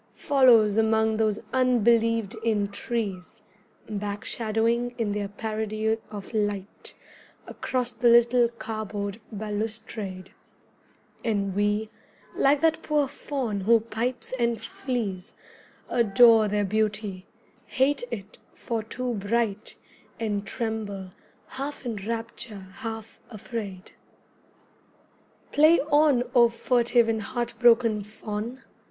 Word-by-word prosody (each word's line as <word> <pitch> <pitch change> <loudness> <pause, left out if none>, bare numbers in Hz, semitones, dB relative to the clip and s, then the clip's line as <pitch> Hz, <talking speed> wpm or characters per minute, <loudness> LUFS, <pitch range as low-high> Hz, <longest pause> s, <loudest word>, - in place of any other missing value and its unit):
Follows 235 -7 +5
among 220 0 +2
those 215 -2 +1 0.2
unbelieved 230 -3 +3
in 215 -3 +1
trees 200 -3 -4 0.4
Back 205 0 -4
shadowing 230 +2 0
in 225 -3 -1
their 205 0 -2
parody 215 +1 -2
of 205 +1 -8
light 205 -2 -3 0.5
Across 250 -2 -3
the 240 +1 +2
little 235 +1 +5
cardboard 215 -2 -5
balustrade; 210 -2 -5 0.9
And 200 -4 0
we, 205 +2 0 0.4
like 280 +1 +3
that 320 -1 +2
poor 295 -2 +1
Faun 265 -6 -3
who 230 +4 +5
pipes 230 +4 -4
and 235 -2 +1
flees, 225 -4 -4 0.5
Adore 225 -1 +5
their 205 0 0
beauty, 210 -2 -1 0.4
hate 270 +1 +1
it 210 -3 -7 0.2
for 230 -2 -3
too 245 +3 -4
bright, 215 0 -1 0.4
And 205 -3 -2
tremble, 205 -5 -4 0.3
half 275 +1 -6
in 230 -3 -3
rapture, 225 -4 -6
half 225 -3 -7
afraid. 205 -4 -7 1.6
Play 310 +3 +6
on, 290 -4 +5
O 240 -2 +6
furtive 235 0 +2
and 225 -1 0
heartbroken 235 -2 +2
Faun! 215 +4 -6
220 Hz, 105 wpm, -26 LUFS, 210-240 Hz, 1.6 s, Play